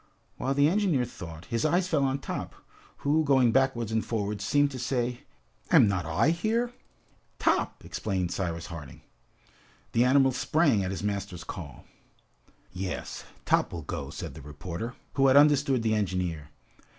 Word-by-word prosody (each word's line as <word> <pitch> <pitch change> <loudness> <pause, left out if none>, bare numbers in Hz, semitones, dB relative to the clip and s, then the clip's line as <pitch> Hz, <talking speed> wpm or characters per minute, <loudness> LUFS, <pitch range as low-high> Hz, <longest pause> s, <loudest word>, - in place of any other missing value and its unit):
While 135 +1 -1
the 140 +1 +5
engineer 175 -8 +2
thought, 85 -8 -9
his 115 -1 -2
eyes 175 +4 +2
fell 155 -6 +1
on 135 0 0
Top, - - -5 0.5
who, 155 +3 +3
going 130 -5 +4
backwards 125 -3 +1
and 110 0 +1
forwards 105 -2 -2
seemed 145 0 +3
to 130 - -6
say, 125 -1 -2 0.4
"Am - - +7
not 95 -4 -1
I 85 - +2
here?" 225 +7 0 0.6
"Top!" - - 0
exclaimed 95 -4 -2
Cyrus 85 -2 -3
Harding. 80 -7 -9 0.9
The 115 - +3
animal 135 +1 +5
sprang 130 - +2
at 90 - -2
his 95 +1 -4
master's 100 -4 -3
call. 80 -7 -8 0.9
"Yes, 90 0 -5 0.2
Top - - +2
will 85 -2 -6
go," - - -5
said - - -6
the - - -10
reporter, 85 - -6 0.2
who 135 -1 +4
had 135 +1 +6
understood 145 -4 +4
the 110 -1 +2
engineer. 90 -7 -2
115 Hz, 155 wpm, -28 LUFS, 90-140 Hz, 0.9 s, Am